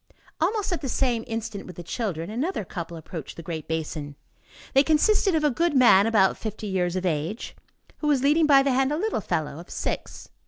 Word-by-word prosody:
Almost 395 +3 0
at 350 - -2
the 270 - -3
same 240 -3 0
instant 225 -3 -5
with 180 - -9
the 175 - -8
children, 180 -3 -3
another 260 - -2
couple 170 -1 -6
approached 160 -1 -8
the 170 - -7
great 160 -2 -5
basin. 155 -2 -4 0.6
They 270 - +7
consisted 345 +5 +3
of 310 - +1
a 295 - +3
goodman, 255 - +5
about 205 -4 +3
fifty 220 0 -5
years 185 -3 -1
of 185 0 -2
age, 165 +6 -2 0.4
who 300 - -2
was 280 -3 +2
leading 300 +3 +4
by 275 -2 +6
the 275 - +1
hand 265 +2 +2
a 300 - 0
little 410 - -1
fellow 155 -4 -2
of 175 - -12
six. - - -5
225 Hz, 200 wpm, -25 LUFS, 175-290 Hz, 0.6 s, They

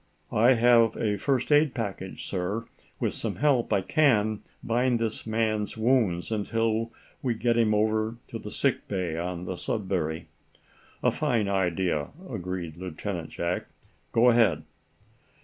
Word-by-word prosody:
"I 120 +5 +6
have 115 -2 +4
a 105 -2 0
first 135 0 0
aid 145 -3 +4
package, 100 -5 -5
sir. 100 +5 -2 0.3
With - - 0
some - - -2
help 140 -5 +2
I 100 - +3
can, 110 - +2 0.2
bind 120 +1 +2
this 115 -1 -3
man's 110 -1 0
wounds 110 -8 +1
until 115 +1 0 0.3
we 125 -3 0
get 120 +1 +1
him 110 -2 +3
over 110 +1 +1
to - - -5
the - - -7
sick - - 0
bay 90 -5 -2
on 90 +1 -4
the 90 - -3
'Sudbury.'" 90 -5 -2 0.8
"A - - +4
fine 110 -4 0
idea," 90 -5 0 0.2
agreed 90 - -5
Lieutenant 90 -1 -5
Jack. 85 +1 -2 0.4
"Go 120 +2 +5
ahead." 110 -10 +3
110 Hz, 140 wpm, -27 LUFS, 90-115 Hz, 0.8 s, I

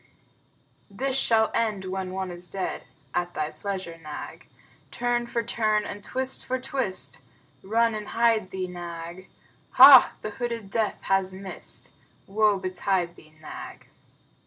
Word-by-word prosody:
This 260 +7 -2
shall 225 -4 +3
end 215 -4 0
when 190 0 -3
one 190 0 -4
is 175 0 -8
dead; 190 -2 -3 0.3
(At 175 0 -2
thy 155 0 -2
pleasure, 190 -4 -5
Nag.) 155 -2 -8 0.4
Turn 240 0 -1
for 235 -1 -1
turn 215 -2 +1
and 205 - -7
twist 260 +3 -1
for 260 0 -2
twist 255 -7 -2 0.4
(Run 230 +3 +2
and 210 -1 -5
hide 230 -4 +2
thee, 190 -1 -3
Nag.) 175 0 -8 0.4
Hah! - - +10
The 215 - -3
hooded 230 -2 -4
Death 220 -1 -1
has 190 -1 +1
missed! 190 0 -6 0.3
(Woe 210 0 +3
betide 185 -1 -1
thee, 155 0 -19
Nag!) 155 - -10
195 Hz, 135 wpm, -26 LUFS, 185-230 Hz, 0.4 s, Hah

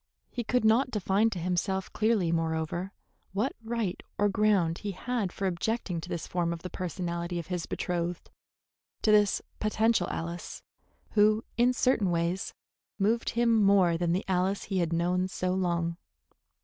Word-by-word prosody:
He 240 - -3
could 250 +1 +1
not 235 +5 +4
define 210 0 +2
to 195 - -5
himself 185 +2 -1
clearly, 215 -6 +2
moreover, 165 +3 -1 0.4
what 215 +7 0
right 225 -5 -2 0.2
or 205 0 +3
ground 195 -5 +2
he 205 -2 -4
had 225 -1 -2
for 195 - -4
objecting 185 -1 -1
to 175 - -9
this 170 -3 -3
form 175 -1 -1
of 170 -1 -5
the 180 - -6
personality 175 -1 -3
of 170 - -4
his 175 -2 -3
betrothed, 175 -1 -3 0.7
to 215 - +4
this 210 -1 +4 0.2
potential 215 -2 +2
Alice, 170 +1 -5 0.5
who 215 +1 +4
in 240 +2 +4
certain 250 -6 +2
ways 170 +2 -1 0.4
moved 220 +4 +1
him 235 -1 +4
more 195 -4 +5
than 170 0 0
the 185 +3 0
Alice 190 +1 +1
he 195 -2 -1
had 170 -2 0
known 180 +2 +1
so 185 -1 -2
long. 170 -2 0
185 Hz, 160 wpm, -29 LUFS, 170-215 Hz, 0.7 s, more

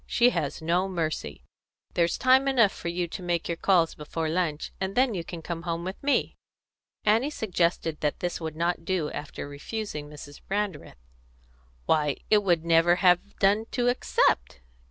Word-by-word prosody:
She 245 +1 +4
has 150 - -3
no 175 +4 +1
mercy. 155 - -3 0.5
There's 170 0 +1
time 260 +1 +4
enough 235 -7 +4
for - - -8
you 175 +1 -1
to 185 - -7
make 175 -2 -1
your 170 - -1
calls 170 -2 +2
before 155 +1 -4
lunch, 160 -3 -1
and 190 +1 -2
then 255 -2 +3
you 175 -4 -3
can 165 -1 -8
come 170 -1 -4
home 170 -1 -3
with 185 +2 -6
me." 285 0 0 0.7
Annie 225 +7 +3
suggested 170 - -1
that 150 -1 -1
this 175 -1 -3
would 160 -1 -4
not 170 +1 -1
do 170 -4 -1
after 145 0 -6
refusing 150 +1 -6
Mrs. 145 -1 -11
Brandreth. 200 - -3 0.9
"Why, 150 -3 +2
it 210 -1 +6
would 175 -4 +1
never 170 +1 +5
have 180 +2 +2
done 205 +3 +3
to 245 -1 +2
accept!" 60 - +1
175 Hz, 170 wpm, -27 LUFS, 160-200 Hz, 0.9 s, it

